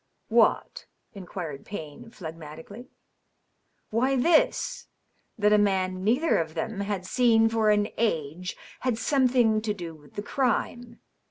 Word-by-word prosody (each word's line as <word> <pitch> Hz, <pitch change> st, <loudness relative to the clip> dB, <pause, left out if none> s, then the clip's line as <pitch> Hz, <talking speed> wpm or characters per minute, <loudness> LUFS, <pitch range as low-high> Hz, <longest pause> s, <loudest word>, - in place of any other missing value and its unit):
" -, -, -49 dB
What -, -, +2 dB
?" -, -, -47 dB
inquired 175 Hz, -7 st, -7 dB
Payne, 205 Hz, +4 st, -8 dB
phl^matically. 165 Hz, +4 st, -10 dB, 0.5 s
" -, -, -37 dB
Why^ 260 Hz, +4 st, +2 dB
this: -, -, +2 dB, 0.5 s
that 210 Hz, -1 st, +3 dB
a 210 Hz, -, +5 dB
man 185 Hz, -2 st, 0 dB
neither 255 Hz, +11 st, +2 dB
of 160 Hz, -1 st, -4 dB
them 200 Hz, +5 st, -3 dB
had 200 Hz, -2 st, -3 dB
seen 225 Hz, +1 st, +4 dB
for 225 Hz, -1 st, +2 dB
an 210 Hz, 0 st, +3 dB
i^ 175 Hz, -4 st, -1 dB, 0.2 s
had 250 Hz, -3 st, -1 dB
something 245 Hz, -5 st, +2 dB
to 210 Hz, -1 st, -2 dB
do 170 Hz, -4 st, -7 dB
with 150 Hz, -2 st, -18 dB
the 205 Hz, -, -4 dB
crime. 240 Hz, -1 st, -2 dB
210 Hz, 145 wpm, -26 LUFS, 180-240 Hz, 0.5 s, a